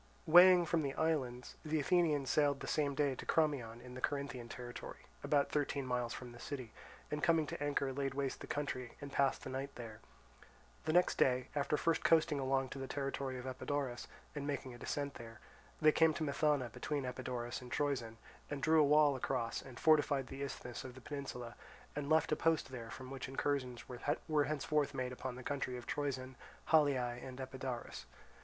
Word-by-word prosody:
Weighing 175 Hz, +2 st, +8 dB
from 165 Hz, 0 st, +1 dB
the 140 Hz, -2 st, -2 dB
islands, 130 Hz, -6 st, -1 dB
the 155 Hz, 0 st, 0 dB
Athenians 150 Hz, -3 st, +2 dB
sailed 145 Hz, -1 st, +3 dB
the -, -, -4 dB
same 145 Hz, -2 st, 0 dB
day 145 Hz, -2 st, +2 dB
to -, -, -7 dB
Crommyon 135 Hz, -8 st, +1 dB
in 125 Hz, 0 st, -10 dB
the 130 Hz, -, -7 dB
Corinthian 140 Hz, -4 st, -2 dB
territory, 120 Hz, 0 st, -8 dB, 0.2 s
about 145 Hz, -1 st, +2 dB
thirteen 140 Hz, -2 st, 0 dB
miles 125 Hz, -2 st, -1 dB
from 125 Hz, 0 st, -6 dB
the 120 Hz, -, -12 dB
city, 125 Hz, -4 st, -6 dB, 0.4 s
and 150 Hz, 0 st, -1 dB
coming 165 Hz, -1 st, +4 dB
to 145 Hz, -, -4 dB
anchor 140 Hz, -2 st, 0 dB
laid 135 Hz, 0 st, -2 dB
waste 135 Hz, -1 st, -2 dB
the -, -, -7 dB
country, 130 Hz, -4 st, -3 dB
and 140 Hz, -1 st, -7 dB
passed 135 Hz, -1 st, +2 dB
the 130 Hz, -, -5 dB
night 135 Hz, +2 st, -4 dB
there. 115 Hz, -3 st, -8 dB, 0.9 s
The 155 Hz, -, +1 dB
next 180 Hz, +1 st, +4 dB
day, 125 Hz, 0 st, +3 dB
after 145 Hz, +1 st, +1 dB
first 165 Hz, +1 st, +1 dB
coasting 160 Hz, -3 st, +4 dB
along 135 Hz, 0 st, +1 dB
to 135 Hz, -, -7 dB
the 135 Hz, -, -4 dB
territory 135 Hz, -2 st, -3 dB
of 125 Hz, -, -7 dB
Epidaurus 130 Hz, -1 st, -3 dB, 0.3 s
and 145 Hz, -1 st, -4 dB
making 135 Hz, -3 st, -3 dB
a 120 Hz, -, -11 dB
descent 140 Hz, -1 st, -2 dB
there, 115 Hz, -1 st, -10 dB, 0.4 s
they 155 Hz, 0 st, +6 dB
came 160 Hz, 0 st, +4 dB
to 160 Hz, -, -2 dB
Methana 140 Hz, -3 st, +1 dB
between 145 Hz, -3 st, -2 dB
Epidaurus 125 Hz, -1 st, -4 dB
and 125 Hz, -1 st, -10 dB
Troezen, 125 Hz, -6 st, -1 dB, 0.3 s
and 140 Hz, -2 st, -4 dB
drew 160 Hz, 0 st, +6 dB
a -, -, +7 dB
wall 150 Hz, -1 st, +5 dB
across 125 Hz, -2 st, -1 dB
and 130 Hz, -2 st, -11 dB
fortified 145 Hz, -4 st, +4 dB
the 135 Hz, +1 st, -7 dB
isthmus 125 Hz, -3 st, -5 dB
of 130 Hz, -1 st, -8 dB
the 130 Hz, -, -11 dB
peninsula, 125 Hz, -4 st, -6 dB, 0.4 s
and 145 Hz, -1 st, -3 dB
left 160 Hz, 0 st, +4 dB
a -, -, +4 dB
post 165 Hz, -3 st, +1 dB
there 115 Hz, -3 st, -6 dB
from 130 Hz, +2 st, -8 dB
which 135 Hz, -1 st, -5 dB
incursions 135 Hz, -3 st, -1 dB
were 145 Hz, +4 st, 0 dB
henceforth 150 Hz, -1 st, 0 dB
made 130 Hz, -1 st, -2 dB
upon 125 Hz, 0 st, -5 dB
the 130 Hz, -, -8 dB
country 135 Hz, -3 st, -2 dB
of 120 Hz, -, -8 dB
Troezen, 130 Hz, -3 st, -3 dB, 0.3 s
Haliae, 130 Hz, -6 st, +3 dB
and 130 Hz, 0 st, -8 dB
Epidaurus. 130 Hz, -2 st, -5 dB
135 Hz, 190 wpm, -36 LUFS, 125-150 Hz, 0.9 s, Weighing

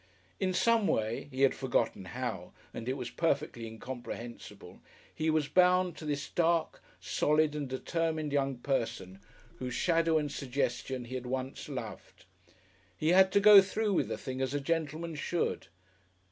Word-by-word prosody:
In 190 Hz, -1 st, +1 dB
some 225 Hz, +3 st, +3 dB
way 110 Hz, +4 st, -1 dB
(he 135 Hz, 0 st, -1 dB
had 135 Hz, -, +5 dB
forgotten 120 Hz, -7 st, -1 dB
how 90 Hz, -, -5 dB, 0.2 s
and 115 Hz, +2 st, -5 dB
it 130 Hz, -, -1 dB
was 125 Hz, -2 st, -5 dB
perfectly 140 Hz, -7 st, -1 dB
incomprehensible) 120 Hz, +1 st, -8 dB, 0.3 s
he 160 Hz, 0 st, -1 dB
was 155 Hz, -2 st, +1 dB
bound 180 Hz, 0 st, +3 dB
to 155 Hz, -, -8 dB
this 145 Hz, -1 st, -2 dB
dark, 170 Hz, -1 st, +1 dB, 0.2 s
solid 150 Hz, 0 st, +1 dB
and 145 Hz, -3 st, -4 dB
determined 155 Hz, +3 st, -2 dB
young 135 Hz, -2 st, 0 dB
person 115 Hz, -8 st, -2 dB, 0.4 s
whose 125 Hz, -1 st, -4 dB
shadow 165 Hz, +2 st, +2 dB
and 150 Hz, -2 st, -1 dB
suggestion 130 Hz, -1 st, -2 dB
he 125 Hz, -, -9 dB
had 125 Hz, -1 st, -4 dB
once 130 Hz, +1 st, -4 dB
loved. -, -, -8 dB, 0.7 s
He 155 Hz, -, 0 dB
had 190 Hz, +2 st, +6 dB
to 200 Hz, -, +5 dB
go 205 Hz, -1 st, +10 dB
through 205 Hz, +2 st, -1 dB
with -, -, +1 dB
the -, -, -3 dB
thing 130 Hz, -1 st, -5 dB
as 130 Hz, +1 st, -1 dB
a -, -, +1 dB
gentleman 165 Hz, +2 st, -2 dB
should. 160 Hz, -, -2 dB
145 Hz, 160 wpm, -31 LUFS, 130-165 Hz, 0.7 s, go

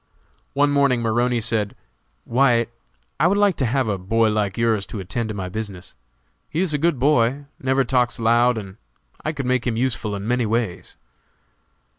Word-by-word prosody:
One 145 Hz, +1 st, +3 dB
morning 140 Hz, -4 st, +2 dB
Maroney 120 Hz, +2 st, +1 dB
said, 105 Hz, -2 st, -1 dB, 0.5 s
"White, 120 Hz, -2 st, +2 dB, 0.5 s
I 155 Hz, -, +4 dB
would 200 Hz, +3 st, +2 dB
like 205 Hz, -3 st, +3 dB
to 130 Hz, -, +1 dB
have 130 Hz, +1 st, 0 dB
a 100 Hz, -3 st, -1 dB
boy 110 Hz, +4 st, +2 dB
like 105 Hz, -3 st, -1 dB
yours 115 Hz, -3 st, +1 dB
to 110 Hz, -, -6 dB
attend 110 Hz, +5 st, -3 dB
to 105 Hz, -, -4 dB
my 95 Hz, -2 st, -4 dB
business; 95 Hz, -2 st, -6 dB, 0.6 s
he 160 Hz, -, -1 dB
is 185 Hz, -5 st, +1 dB
a 150 Hz, -, 0 dB
good 165 Hz, -1 st, +2 dB
boy, 135 Hz, 0 st, +2 dB
never 135 Hz, +1 st, +2 dB
talks 125 Hz, -1 st, +1 dB
loud, 120 Hz, +1 st, +3 dB
and 100 Hz, -2 st, -7 dB, 0.5 s
I 155 Hz, -, -1 dB
could 140 Hz, -4 st, -5 dB
make 125 Hz, -1 st, 0 dB
him 115 Hz, -2 st, 0 dB
useful 115 Hz, -4 st, -1 dB
in 100 Hz, +1 st, -5 dB
many 120 Hz, -1 st, +1 dB
ways." 110 Hz, -4 st, -2 dB
120 Hz, 180 wpm, -22 LUFS, 110-135 Hz, 0.6 s, I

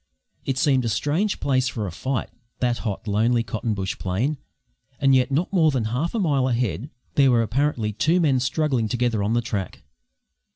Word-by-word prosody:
"' -, -, -42 dB
It 130 Hz, -, -3 dB
seemed 135 Hz, -2 st, +3 dB
a 115 Hz, -, -1 dB
strange 155 Hz, -, 0 dB
place 130 Hz, -2 st, +1 dB
for 115 Hz, -4 st, -3 dB
a 95 Hz, -, -4 dB
fight 130 Hz, +8 st, -3 dB, 0.3 s
that 120 Hz, -1 st, 0 dB
hot, 105 Hz, -2 st, -4 dB
lonely, 115 Hz, +3 st, +2 dB
cotton 110 Hz, 0 st, -3 dB
bush 95 Hz, -2 st, -3 dB
plain. 115 Hz, +11 st, -1 dB, 0.6 s
And 135 Hz, -1 st, +4 dB
yet 130 Hz, -1 st, +3 dB
not 165 Hz, +8 st, 0 dB
more 165 Hz, -5 st, +4 dB
than 130 Hz, -5 st, 0 dB
half 160 Hz, -, -1 dB
a -, -, +1 dB
mile 140 Hz, -8 st, +2 dB
ahead 120 Hz, +1 st, -1 dB, 0.2 s
there 135 Hz, -2 st, +4 dB
were 120 Hz, -2 st, +4 dB
apparently 115 Hz, -2 st, 0 dB
two 160 Hz, -, +2 dB
men 140 Hz, -6 st, +3 dB
struggling 130 Hz, -2 st, 0 dB
together 120 Hz, -2 st, 0 dB
on 105 Hz, +3 st, 0 dB
the 120 Hz, 0 st, +1 dB
track. 100 Hz, -5 st, -4 dB
125 Hz, 195 wpm, -23 LUFS, 110-140 Hz, 0.6 s, And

